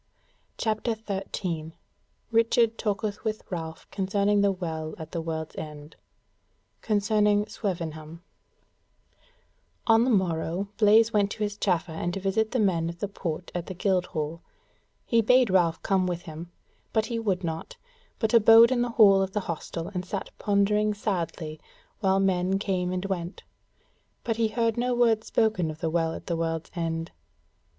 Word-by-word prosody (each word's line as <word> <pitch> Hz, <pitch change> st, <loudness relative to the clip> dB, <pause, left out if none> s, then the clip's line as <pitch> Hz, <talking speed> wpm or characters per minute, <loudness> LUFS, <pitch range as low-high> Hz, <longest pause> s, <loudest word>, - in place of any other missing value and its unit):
CHAPTER 220 Hz, +1 st, -1 dB
13 185 Hz, -6 st, -4 dB, 0.6 s
Richard 230 Hz, 0 st, +3 dB
Talketh 210 Hz, -1 st, -2 dB
With 215 Hz, -1 st, -2 dB
Ralph 160 Hz, -2 st, -5 dB
Concerning 200 Hz, +1 st, +1 dB
the 200 Hz, 0 st, +3 dB
Well 160 Hz, -4 st, -4 dB
at 160 Hz, 0 st, -9 dB
the 170 Hz, -, -3 dB
World's 160 Hz, -1 st, -4 dB
End. 150 Hz, -1 st, -8 dB, 0.9 s
Concerning 210 Hz, -1 st, +2 dB
Swevenham 170 Hz, -6 st, -5 dB, 1.6 s
On 225 Hz, 0 st, +5 dB
the 255 Hz, -, +1 dB
morrow 185 Hz, -2 st, 0 dB
Blaise 220 Hz, +1 st, +5 dB
went 205 Hz, -1 st, +3 dB
to 215 Hz, -, -3 dB
his 205 Hz, -1 st, -2 dB
chaffer 180 Hz, -5 st, 0 dB
and 175 Hz, +3 st, -3 dB
to -, -, -2 dB
visit 200 Hz, +3 st, 0 dB
the 255 Hz, -, -1 dB
men 170 Hz, -6 st, +1 dB
of 170 Hz, -, -7 dB
the 205 Hz, -, -3 dB
Port 175 Hz, -3 st, -5 dB
at 175 Hz, -1 st, -4 dB
the 185 Hz, -, -6 dB
Guildhall: 175 Hz, -5 st, -1 dB, 0.6 s
he 230 Hz, -1 st, +3 dB
bade 250 Hz, 0 st, +4 dB
Ralph 170 Hz, -3 st, +2 dB
come 190 Hz, -2 st, +2 dB
with 175 Hz, -1 st, -3 dB
him, 165 Hz, +1 st, -9 dB, 0.4 s
but 220 Hz, -1 st, +2 dB
he 230 Hz, -1 st, -3 dB
would 195 Hz, -5 st, -1 dB
not, 165 Hz, -1 st, -5 dB, 0.4 s
but 220 Hz, -1 st, -1 dB
abode 230 Hz, +1 st, +8 dB
in 250 Hz, -2 st, +2 dB
the 245 Hz, -, 0 dB
hall 205 Hz, -4 st, +6 dB
of 190 Hz, 0 st, -2 dB
the 210 Hz, -, 0 dB
hostel 170 Hz, 0 st, -5 dB
and 180 Hz, -1 st, -2 dB
sat 190 Hz, +2 st, -5 dB
pondering 210 Hz, +1 st, +2 dB
sadly 170 Hz, -6 st, -3 dB, 0.4 s
while 195 Hz, -2 st, +2 dB
men 190 Hz, 0 st, +1 dB
came 185 Hz, -3 st, -1 dB
and 185 Hz, +1 st, -2 dB
went; 180 Hz, -1 st, -4 dB, 0.8 s
but 225 Hz, -1 st, -1 dB
he 230 Hz, -1 st, +2 dB
heard 230 Hz, +1 st, 0 dB
no 245 Hz, +1 st, +1 dB
word 230 Hz, -2 st, +3 dB
spoken 215 Hz, -9 st, +1 dB
of 155 Hz, 0 st, -7 dB
the 165 Hz, -1 st, -1 dB
Well 165 Hz, -1 st, 0 dB
at -, -, -9 dB
the 170 Hz, -, -1 dB
World's 165 Hz, -1 st, -3 dB
End. 165 Hz, -1 st, -3 dB
195 Hz, 160 wpm, -27 LUFS, 170-215 Hz, 1.6 s, abode